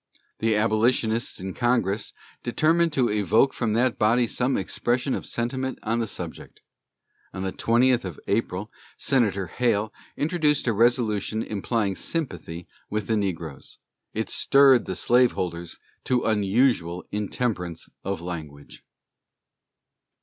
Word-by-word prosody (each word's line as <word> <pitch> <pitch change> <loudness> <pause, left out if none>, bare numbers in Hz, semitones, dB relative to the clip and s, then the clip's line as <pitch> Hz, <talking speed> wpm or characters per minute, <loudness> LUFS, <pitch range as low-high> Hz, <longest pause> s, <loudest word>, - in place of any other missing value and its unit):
The 110 -1 +2
Abolitionists 110 +1 +1
in 95 0 -5
Congress 115 -4 0 0.3
determined 165 +7 +2
to 125 -6 +2
evoke 105 +6 +3
from 115 -3 -1
that 120 +2 +1
body 120 +3 +4
some 125 +3 0
expression 120 +7 -1
of - - -3
sentiment 130 +2 -2
on 115 +1 0
the 115 - -1
subject. 85 -4 -7 0.7
On 95 - -4
the 95 - -2
20th 120 +1 +3
of 90 -6 -6
April 100 -1 -1 0.3
Senator 105 -8 +1
Hale 110 +2 0 0.2
introduced 150 -2 +1
a 120 - +2
resolution 110 -1 +1
implying 105 -1 -1
sympathy 90 - -4 0.2
with 105 -1 -2
the 110 - 0
negroes. 85 -8 -4 0.3
It - - -3
stirred 135 -2 +5
the - - -4
slaveholders 90 -9 +1 0.3
to 125 -1 +1
unusual 105 -4 +1
intemperance 100 -5 -2 0.2
of 95 -2 -3
language. 75 -5 -8
110 Hz, 120 wpm, -25 LUFS, 95-125 Hz, 0.7 s, stirred